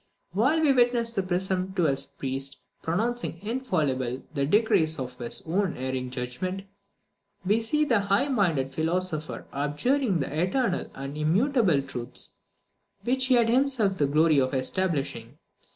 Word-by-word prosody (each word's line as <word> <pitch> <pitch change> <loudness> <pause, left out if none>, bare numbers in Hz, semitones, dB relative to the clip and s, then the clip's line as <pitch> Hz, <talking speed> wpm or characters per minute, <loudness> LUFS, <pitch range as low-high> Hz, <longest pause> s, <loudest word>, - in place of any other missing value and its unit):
While 260 - +2
we 295 -3 +4
witness 240 -2 +2
the 200 - 0
presumptuous 185 -6 0
priest 135 +1 -4 0.2
pronouncing 220 +2 -1
infallible 150 - -1
the 140 -2 0
decrees 165 -5 +3
of 130 -2 -5
his 120 -1 -2
own 185 +3 0
erring 130 0 -3
judgment, 130 +10 -4 0.8
we 210 +4 +3
see 300 +7 +1
the 235 -7 +3
high 200 +7 +1
minded 170 - +1
philosopher 160 +1 -2
abjuring 180 - 0
the 150 +3 -2
eternal 185 +1 0
and 135 +1 -6
immutable 180 - +2
truths 125 -3 -5 0.6
which 260 +3 +1
he 260 - +5
had 235 -2 +4
himself 240 -6 +2
the 145 - +3
glory 155 +1 +4
of 130 +1 0
establishing. 140 -4 -2
180 Hz, 135 wpm, -27 LUFS, 140-230 Hz, 0.8 s, he